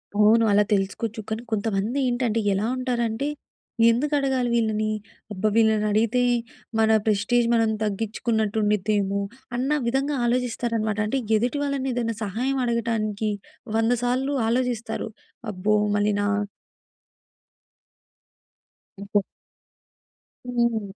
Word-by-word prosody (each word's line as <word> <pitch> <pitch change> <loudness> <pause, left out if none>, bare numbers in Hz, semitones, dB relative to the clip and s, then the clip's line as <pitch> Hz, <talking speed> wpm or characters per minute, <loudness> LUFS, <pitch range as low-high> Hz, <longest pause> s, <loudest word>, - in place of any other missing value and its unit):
అవును. 215 +2 +5
అలా 205 +1 +5
తెలుసుకోవచ్చు. 205 +3 -1
కానీ 220 +1 -2
కొంతమంది 215 +3 -1
ఏంటంటే 240 -2 0
ఎలా 200 +3 0
ఉంటారంటే? 240 0 -1 0.6
ఎందుకు 280 +6 +1
అడగాలి 265 -3 0
వీళ్ళని. 215 -2 +1 0.4
అబ్బా! 205 +1 -1
వీళ్ళని 220 -2 +3
అడిగితే 230 +4 +2 0.6
మన 220 0 +4 0.2
ప్రెస్‌టేజ్ 220 +3 +2
మనం 225 -1 +3
తగ్గించుకున్నట్టు 220 +1 -1
ఉండిద్దేమో. 205 -1 +1 0.4
అన్న 260 +4 -1 0.2
విధంగా 270 +4 0
ఆలోచిస్తారనమాట. 230 -3 -1
అంటే 270 +5 0 0.2
ఎదుటి 245 +6 -1
వాళ్ళని 275 -2 -1
ఏదైనా 230 -2 -1
సహాయం 250 +7 -1
అడగటానికి 225 -3 -1 0.5
వంద 225 +1 +2
సార్లు 260 +3 0 0.2
ఆలోచిస్తారు. 240 -2 -1 0.4
అబ్బో! 205 +2 +1 0.2
మళ్ళీ‌నా. 205 0 +1 2.7
ఎందుకో 200 +1 0 1.2
హ్మ్. 235 -2 +1
225 Hz, 100 wpm, -24 LUFS, 210-245 Hz, 2.7 s, అవును